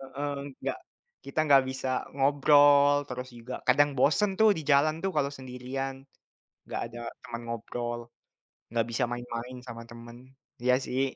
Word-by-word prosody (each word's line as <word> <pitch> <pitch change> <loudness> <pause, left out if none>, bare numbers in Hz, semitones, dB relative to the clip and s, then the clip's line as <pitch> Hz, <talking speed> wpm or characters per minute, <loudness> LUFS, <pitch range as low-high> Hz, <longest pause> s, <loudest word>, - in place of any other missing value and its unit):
Heeh. 140 +2 -4 0.3
Nggak - - -2 0.5
kita 140 - -6
nggak 135 -2 +7
bisa 130 0 -4 0.3
ngobrol, 145 +1 +6 0.2
terus 125 0 -5
juga 125 +2 -7
kadang 145 +3 +5
bosen 200 +7 +3
tuh 220 - +7
di - - -3
jalan 150 +2 +4
tuh, 195 - 0
kalau 140 -1 +2
sendirian. 130 +1 -5 0.7
Nggak - - -4
ada 120 +1 -9 0.2
teman 115 0 -6
ngobrol, 120 +1 -4 0.7
nggak 115 -1 +2
bisa 125 +2 0
main-main 120 +1 -5
sama 115 -1 -7
temen. 120 0 -11 0.5
Iya 125 0 +4
sih. 130 +2 0
130 Hz, 145 wpm, -28 LUFS, 120-140 Hz, 0.7 s, nggak